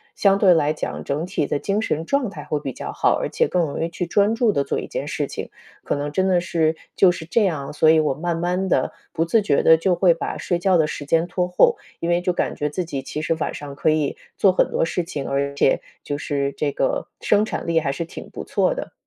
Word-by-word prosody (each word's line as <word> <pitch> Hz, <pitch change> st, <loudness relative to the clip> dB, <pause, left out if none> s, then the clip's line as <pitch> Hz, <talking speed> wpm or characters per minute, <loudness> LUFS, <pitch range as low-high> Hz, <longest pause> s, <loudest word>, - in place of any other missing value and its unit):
相 195 Hz, -1 st, +4 dB
对 190 Hz, -3 st, +6 dB
来 150 Hz, -3 st, +2 dB
讲， 155 Hz, -, -5 dB
整 145 Hz, +4 st, -2 dB
体 180 Hz, -5 st, -1 dB
的 -, -, 0 dB
精 200 Hz, +8 st, -1 dB
神 160 Hz, -7 st, -2 dB
状 275 Hz, +2 st, 0 dB
态 195 Hz, -, -9 dB
会 150 Hz, -, -1 dB
比 135 Hz, -, -4 dB
较 -, -, -6 dB
好， -, -, +2 dB
而 -, -, -1 dB
且 -, -, +1 dB
更 180 Hz, -1 st, +1 dB
容 155 Hz, 0 st, -3 dB
易 165 Hz, -, -1 dB
去 175 Hz, +1 st, -3 dB
专 205 Hz, +4 st, +3 dB
注 230 Hz, -2 st, +3 dB
地 140 Hz, -, +1 dB
做 140 Hz, -, -2 dB
一 -, -, -6 dB
件 -, -, -4 dB
事 -, -, -2 dB
情。 -, -, -6 dB, 0.3 s
可 -, -, -1 dB
能 145 Hz, +1 st, -3 dB
真 190 Hz, +4 st, +1 dB
的 185 Hz, -2 st, +3 dB
是， 165 Hz, -2 st, 0 dB, 0.2 s
就 185 Hz, -2 st, +6 dB
是 160 Hz, -, -7 dB
这 215 Hz, +7 st, +2 dB
样， 150 Hz, -7 st, -2 dB
所 155 Hz, +1 st, +4 dB
以 160 Hz, 0 st, +6 dB
我 150 Hz, -3 st, +1 dB
慢 165 Hz, +4 st, -2 dB
慢 180 Hz, +2 st, -1 dB
地 130 Hz, -, +1 dB, 0.2 s
不 165 Hz, -, 0 dB
自 220 Hz, +6 st, +3 dB
觉 170 Hz, -9 st, +1 dB
地 160 Hz, -, +7 dB
就 175 Hz, +3 st, +1 dB
会 175 Hz, 0 st, +4 dB
把 165 Hz, -, -4 dB
睡 175 Hz, -, -1 dB
觉 185 Hz, 0 st, +3 dB
的 160 Hz, -, +3 dB
时 150 Hz, -, -5 dB
间 165 Hz, +3 st, +2 dB
拖 180 Hz, 0 st, -1 dB
后， 180 Hz, -, +4 dB, 0.2 s
因 170 Hz, -, -3 dB
为 175 Hz, 0 st, +2 dB
就 180 Hz, 0 st, +1 dB
感 175 Hz, -, -1 dB
觉 150 Hz, -, -2 dB
自 175 Hz, +4 st, -3 dB
己 140 Hz, -5 st, -4 dB
其 150 Hz, +3 st, -5 dB
实 165 Hz, -, +1 dB
晚 -, -, -1 dB
上 145 Hz, -1 st, -8 dB
可 150 Hz, -, +1 dB
以 155 Hz, -2 st, +1 dB, 0.2 s
做 195 Hz, -, +5 dB
很 -, -, +2 dB
多 -, -, +1 dB
事 175 Hz, +2 st, -2 dB
情， 145 Hz, -4 st, -5 dB
而 140 Hz, +1 st, -1 dB
且 140 Hz, -, +2 dB, 0.2 s
就 145 Hz, -, -3 dB
是 140 Hz, -2 st, -2 dB
这 150 Hz, -2 st, -1 dB
个 135 Hz, -, -1 dB
生 210 Hz, 0 st, +3 dB
产 220 Hz, -, -4 dB
力 165 Hz, -1 st, +2 dB
还 145 Hz, -4 st, -1 dB
是 150 Hz, +5 st, -4 dB
挺 170 Hz, -, -10 dB
不 -, -, -7 dB
错 -, -, +1 dB
的。 -, -, -6 dB
165 Hz, 285 characters per minute, -22 LUFS, 150-180 Hz, 0.3 s, 地